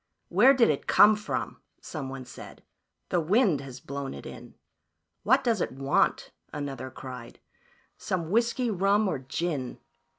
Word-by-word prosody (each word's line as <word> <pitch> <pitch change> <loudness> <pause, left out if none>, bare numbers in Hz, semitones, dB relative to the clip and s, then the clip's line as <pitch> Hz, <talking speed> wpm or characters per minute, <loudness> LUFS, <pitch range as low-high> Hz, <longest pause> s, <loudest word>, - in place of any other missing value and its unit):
"Where 245 +10 +6
did 235 -9 +4
it 140 - -4
come 215 +1 +7
from?" 210 0 -4 0.2
someone 135 -4 -7
said. 125 - -12 0.2
" - - -54
The 175 - +2
wind 185 - +2
has 130 -2 -9
blown 140 - -6
it 70 - -10
in." - - -10 0.7
"What 260 +5 +3
does 230 -6 +1
it - - -1
want?" 135 +1 +1 0.2
another 135 -3 -5
cried. 125 -2 -10 0.6
"Some 170 -3 -3
whiskey, 235 +2 +1
rum 200 +2 +2
or 165 - -1
gin?" 135 0 -3
160 Hz, 145 wpm, -27 LUFS, 135-210 Hz, 0.7 s, come